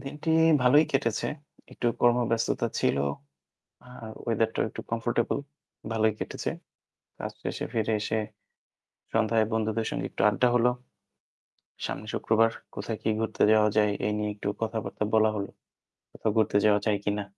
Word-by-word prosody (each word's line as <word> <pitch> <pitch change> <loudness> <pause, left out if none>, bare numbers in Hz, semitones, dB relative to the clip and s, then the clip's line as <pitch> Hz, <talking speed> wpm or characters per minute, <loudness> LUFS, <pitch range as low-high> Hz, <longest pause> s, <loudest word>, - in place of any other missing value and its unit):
দিনটি 150 +3 -4 0.3
ভালোই 145 +5 +6
কেটেছে। 125 -5 0 0.5
একটু 120 - -3
কর্মব্যস্ততা 120 -1 +2
ছিল। - - +2 0.9
আর 115 -3 -10 0.2
ওয়েদারটাও 115 -1 +1
একটু - - -7
কমফোর্টেবল। 115 0 0 0.5
ভালোই 110 -1 +2
কেটেছে। - - -3 0.7
কাজ - - -5
শেষে - - -3
ফিরে 110 -1 0
এসে 110 +1 -1 1.0
সন্ধ্যায় 110 0 +3
বন্ধুদের 110 0 0
সঙ্গে - - -3
একটু - - -3
আড্ডা 115 +4 +2
হলো। 125 0 +4 1.2
সামনে - - -5
শুক্রবার। 115 0 +3 0.2
কোথায় 105 +2 -4
কি - - 0
ঘুরতে 110 - 0
যাওয়া 105 0 +4
যায়? 105 -1 +4
এই 105 - +1
নিয়ে 105 0 -1
একটু 100 - -6
কথাবার্তা 110 -1 -2
বলা 110 0 +5
হলো। 100 -1 -3 0.6
কোথাও 110 - -1
ঘুরতে 110 -2 +3
যাওয়া 105 -1 +5
যায় 105 -2 +2
কিনা? 105 0 -1
110 Hz, 140 wpm, -27 LUFS, 105-115 Hz, 1.2 s, ভালোই